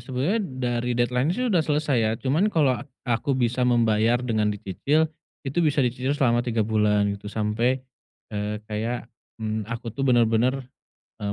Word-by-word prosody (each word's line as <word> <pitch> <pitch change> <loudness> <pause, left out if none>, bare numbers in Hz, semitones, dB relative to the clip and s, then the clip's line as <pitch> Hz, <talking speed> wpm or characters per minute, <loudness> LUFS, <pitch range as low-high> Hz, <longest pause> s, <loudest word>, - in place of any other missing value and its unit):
sebetulnya 135 - -1
dari 125 - -2
deadline-nya 125 +7 +1
sih 250 0 0
udah 175 - +4
selesai 150 -3 0
ya. 110 -1 +2
Cuman 155 - +1
kalo 145 - +2
a - - -6 0.2
aku 130 +3 0
bisa 125 0 0
membayar 115 -1 +3
dengan 110 -3 +1
dicicil, 105 - 0 0.4
itu 140 +4 -3
bisa 145 -4 +2
dicicil 130 +4 -1
selama 120 -4 +3
3 115 -3 0
bulan 105 -2 +2
gitu, 100 +1 -7
sampai, 115 +5 0 0.5
eee, 105 +1 -2
kayak, 110 +3 -3 0.3
mmm, 110 -1 -3
aku 115 -1 -5
tuh 140 - -7
bener-bener, 125 0 +2 0.6
eee, 100 - -1
120 Hz, 160 wpm, -25 LUFS, 110-135 Hz, 0.6 s, udah